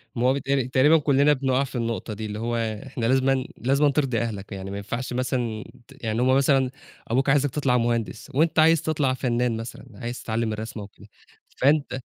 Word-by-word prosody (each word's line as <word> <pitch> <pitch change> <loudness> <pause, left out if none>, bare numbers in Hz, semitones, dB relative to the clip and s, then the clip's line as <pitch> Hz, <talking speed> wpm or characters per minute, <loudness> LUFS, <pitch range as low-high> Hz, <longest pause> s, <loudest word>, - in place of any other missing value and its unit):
ما 120 +1 +1
هو 130 - +4
بيتهيّأ 140 0 0
لي 130 -3 0
تقريبًا 135 +5 +5
كلّنا 145 0 +3
بنُقع 135 -1 +1
في 135 - -8
النقطة 115 -2 -2
دي، 110 +1 -6
اللي 105 0 -5
هو 120 +1 -2
إحنا 115 +2 -3
لازمًا، 130 +1 +2
لازمًا 140 +4 +2
ترضي 135 -4 0
أهلك، 105 -4 -4
يعني 95 -1 -6
ما 100 - -4
ينفعش 120 +6 -4
مثلًا 120 -3 -2 0.2
ت - - -18
يعني 110 +1 -1
هُم 130 +1 +4
مثلًا 135 -1 +3 0.4
أبوك 130 +4 +1
عايزك 145 +1 +3
تطلَع 130 -2 +1
مهندس 115 +2 -2
وأنت 160 +3 +2
عايز 160 0 +5
تطلَع 150 -5 0
فنان 125 -2 0
مثلًا، 115 +3 -8
عايز 120 +4 -6
تتعلّم 110 -1 -1
الرسم 110 +1 -6
أو 100 - -7
كده، 100 - -18 0.5
فأنت 140 -2 +2
125 Hz, 200 wpm, -24 LUFS, 115-135 Hz, 0.5 s, تقريبًا